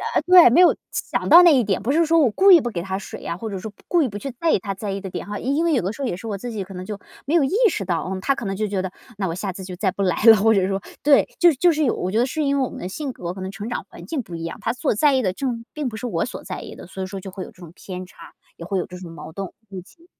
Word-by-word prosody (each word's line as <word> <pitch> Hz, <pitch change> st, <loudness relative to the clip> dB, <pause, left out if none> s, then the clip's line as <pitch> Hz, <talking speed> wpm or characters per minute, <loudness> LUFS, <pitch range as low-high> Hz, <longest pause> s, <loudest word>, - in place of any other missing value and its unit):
啊， -, -, +5 dB
对， 360 Hz, -6 st, +8 dB
没 335 Hz, +10 st, +5 dB
有 360 Hz, -, +7 dB, 0.2 s
想 -, -, -2 dB
到 350 Hz, +1 st, +9 dB
那 340 Hz, -, +7 dB
一 -, -, +4 dB
点， 195 Hz, -3 st, -1 dB
不 255 Hz, -, 0 dB
是 330 Hz, +2 st, +3 dB
说 330 Hz, +1 st, +3 dB
我 255 Hz, -8 st, +4 dB
故 390 Hz, -, +5 dB
意 335 Hz, -, +8 dB
不 240 Hz, -, -2 dB
给 170 Hz, -, -3 dB
他 190 Hz, +1 st, -3 dB
水 200 Hz, -, -8 dB
呀， 170 Hz, -, -4 dB
或 220 Hz, +2 st, -5 dB
者 195 Hz, -2 st, -5 dB
说 215 Hz, +2 st, -7 dB, 0.2 s
故 345 Hz, -, +3 dB
意 280 Hz, -, +2 dB
不 205 Hz, -2 st, -6 dB
去 275 Hz, +5 st, -5 dB
在 335 Hz, -, +1 dB
意 -, -, +4 dB
他 195 Hz, +1 st, -4 dB
在 195 Hz, +1 st, -5 dB
意 195 Hz, -, -4 dB
的 190 Hz, -, -6 dB
点 -, -, -6 dB
哈， 205 Hz, 0 st, -4 dB
因 280 Hz, +6 st, 0 dB
为 330 Hz, -, +2 dB
有 250 Hz, -, +2 dB
的 190 Hz, +3 st, -2 dB
时 280 Hz, -, -9 dB
候 270 Hz, -, -1 dB
也 175 Hz, -, -2 dB
是 180 Hz, -, -10 dB
我 210 Hz, -3 st, -3 dB
自 240 Hz, +4 st, -6 dB
己 210 Hz, -3 st, -4 dB
可 195 Hz, +1 st, -11 dB
能 185 Hz, 0 st, -7 dB
就 210 Hz, -1 st, -5 dB, 0.3 s
没 290 Hz, -, -2 dB
有 330 Hz, -4 st, +4 dB
意 270 Hz, -, -1 dB, 0.2 s
识 195 Hz, -, -3 dB
到， 175 Hz, -1 st, -2 dB
嗯， 190 Hz, 0 st, -4 dB
他 275 Hz, -, +2 dB
可 235 Hz, -, -6 dB
能 195 Hz, 0 st, -2 dB
就 215 Hz, -, -1 dB
觉 195 Hz, -2 st, -1 dB
得 190 Hz, -1 st, -4 dB, 0.3 s
那 195 Hz, -, -1 dB
我 165 Hz, -, -3 dB
下 195 Hz, +1 st, -3 dB
次 190 Hz, +1 st, -9 dB
就 185 Hz, -1 st, -7 dB
再 190 Hz, +1 st, 0 dB
不 200 Hz, -, -5 dB
来 185 Hz, 0 st, 0 dB
了， 225 Hz, -2 st, +9 dB
或 220 Hz, +3 st, +4 dB
者 190 Hz, -3 st, +2 dB
说 195 Hz, 0 st, -2 dB, 0.2 s
对， 285 Hz, -1 st, +5 dB
就 345 Hz, 0 st, +7 dB
就 335 Hz, +5 st, +3 dB
是 305 Hz, 0 st, 0 dB
有， 255 Hz, -, +2 dB
我 185 Hz, -, -3 dB
觉 215 Hz, -, 0 dB
得 240 Hz, -, +3 dB
是 305 Hz, +4 st, -3 dB
因 280 Hz, 0 st, +1 dB
为 270 Hz, -, +2 dB
我 -, -, -5 dB
们 -, -, -9 dB
的 180 Hz, -, -5 dB
性 275 Hz, +7 st, -4 dB
格 175 Hz, -6 st, -6 dB
可 190 Hz, -, -9 dB
能 190 Hz, -, -5 dB
成 200 Hz, +3 st, -7 dB
长 -, -, -4 dB
环 -, -, -12 dB
境 305 Hz, -6 st, -3 dB
不 170 Hz, -, -9 dB
一 165 Hz, -, -6 dB
样， 165 Hz, -, -6 dB
他 230 Hz, -, 0 dB
所 245 Hz, -3 st, -1 dB
在 290 Hz, +5 st, +4 dB
意 260 Hz, -, +2 dB
的 185 Hz, -4 st, 0 dB
正 235 Hz, -1 st, -3 dB
并 295 Hz, -4 st, -3 dB
不 220 Hz, -, -8 dB
是 245 Hz, -, -4 dB
我 -, -, -1 dB
所 -, -, -8 dB
在 -, -, -5 dB
意 -, -, -9 dB
的， -, -, -11 dB
所 190 Hz, 0 st, -6 dB
以 -, -, -2 dB
说 195 Hz, +1 st, -6 dB
就 190 Hz, -, -8 dB
会 185 Hz, 0 st, -6 dB
有 -, -, -11 dB
这 180 Hz, -, -20 dB
种 170 Hz, -1 st, -11 dB
偏 185 Hz, -1 st, -7 dB
差， 170 Hz, -2 st, -14 dB, 0.2 s
也 170 Hz, -, -9 dB
会 190 Hz, +1 st, -1 dB
有 -, -, -2 dB
这 180 Hz, -, -9 dB
种 175 Hz, -2 st, -9 dB
矛 160 Hz, -1 st, -10 dB
盾， 195 Hz, -2 st, -5 dB, 0.2 s
估 190 Hz, -2 st, -7 dB
计。 335 Hz, -, -21 dB
205 Hz, 390 characters per minute, -22 LUFS, 185-270 Hz, 0.3 s, 到